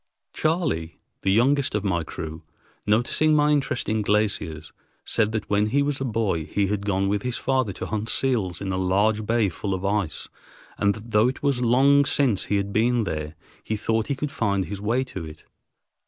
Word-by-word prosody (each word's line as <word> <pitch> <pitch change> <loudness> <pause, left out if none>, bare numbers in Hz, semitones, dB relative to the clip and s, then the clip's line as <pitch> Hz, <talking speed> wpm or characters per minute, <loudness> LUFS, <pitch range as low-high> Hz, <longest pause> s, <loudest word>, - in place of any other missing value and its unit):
Charley, 150 - -1 0.2
the 95 - +1
youngest 135 +5 +2
of 105 - -1
my 90 -5 0
crew, 80 0 -7 0.5
noticing 120 +8 +3
my 150 0 +4
interest 140 -4 0
in 110 0 0
glaciers, 100 -7 -1 0.3
said 110 -1 +1
that 110 -2 -3
when 105 +1 +2
he 140 +6 +2
was 140 -1 -2
a - - 0
boy 105 -9 -1
he 100 +5 0
had 100 +1 -2
gone 95 -1 +1
with 100 0 0
his 125 0 -2
father 130 -5 0
to - - -6
hunt 110 +1 -3
seals 110 -12 0
in 95 -1 -3
a 95 - -1
large 100 +4 +1
bay 115 -2 +2
full 95 +2 -3
of 95 +1 -5
ice, 100 -5 -1 0.5
and 100 0 +2
that 110 +2 -11
though 105 +2 +4
it 130 - -4
was 140 -4 +1
long 135 +4 +4
since 130 -8 +2
he 105 - 0
had 100 0 -2
been 120 +1 +2
there, 75 -4 -4 0.3
he 110 - -2
thought 110 +1 0
he 140 - -1
could 140 +1 -4
find 100 -9 0
his 100 +3 -6
way 115 +5 +1
to 95 -9 -7
it. 80 -1 -10
105 Hz, 200 wpm, -24 LUFS, 95-125 Hz, 0.5 s, my